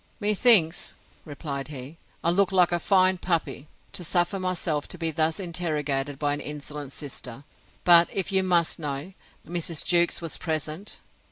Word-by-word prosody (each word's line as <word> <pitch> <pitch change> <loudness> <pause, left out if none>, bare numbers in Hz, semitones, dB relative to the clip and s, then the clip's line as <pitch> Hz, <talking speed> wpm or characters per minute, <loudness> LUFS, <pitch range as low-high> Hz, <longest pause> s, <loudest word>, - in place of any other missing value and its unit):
Methinks, 205 -5 +4 0.3
replied 140 -2 -6
he, 145 +2 -9 0.2
I 170 - +3
look 195 +2 +2
like 180 -2 +4
a 175 - +1
fine 185 0 +3
puppy, 165 -5 -2 0.3
to 195 -3 -5
suffer 175 +3 0
myself 175 -5 -2
to - - -6
be 165 -1 -1
thus 160 +2 0
interrogated 150 -6 -2
by 145 0 0
an 145 - -3
insolent 145 -1 -6
sister: 135 -3 -6 0.4
but, 170 -1 +8
if 195 -1 -1
you 190 -1 +4
must 175 -3 +1
know, 145 +4 -5 0.3
Mrs. 170 -2 -2
Jewkes 175 -1 +3
was 165 -2 -2
present. 160 +4 -4
165 Hz, 155 wpm, -25 LUFS, 150-180 Hz, 0.4 s, but